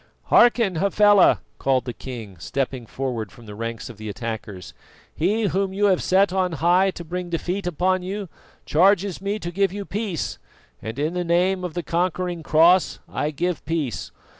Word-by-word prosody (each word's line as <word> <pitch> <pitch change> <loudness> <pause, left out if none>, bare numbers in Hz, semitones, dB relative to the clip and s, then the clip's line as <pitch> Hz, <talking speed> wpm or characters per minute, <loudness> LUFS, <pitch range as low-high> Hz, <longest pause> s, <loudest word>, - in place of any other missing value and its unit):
"Hearken, 235 -7 +5
Hafela!" 200 +1 +5 0.2
called 130 -2 +1
the 125 - -4
king, 115 -8 -8
stepping 125 - -3
forward 120 -7 -4
from 120 +4 -15
the 105 - -9
ranks 115 +2 -5
of 120 - -10
the 110 0 -7
attackers. 110 -3 -6 0.4
"He 205 +8 +1
whom 195 -1 0
you 205 +2 +1
have 190 -3 +3
set 190 0 +3
on 185 -2 0
high 175 +5 +3
to 180 - -6
bring 175 +2 -5
defeat 175 +3 -2
upon 185 +2 +1
you 195 +2 -4 0.4
charges 190 +2 +3
me 200 +2 -1
to 175 -4 -5
give 195 +1 +1
you 200 +1 -5
peace, 200 -4 -3 0.4
and 110 +3 -6
in 150 +4 -1
the 180 0 -1
name 180 +2 +1
of 180 -2 -5
the 175 - -2
conquering 175 +1 -1
Cross 165 +4 +4
I 150 - -2
give 175 +3 -2
peace. 150 -6 -3
175 Hz, 175 wpm, -23 LUFS, 135-190 Hz, 0.4 s, Hearken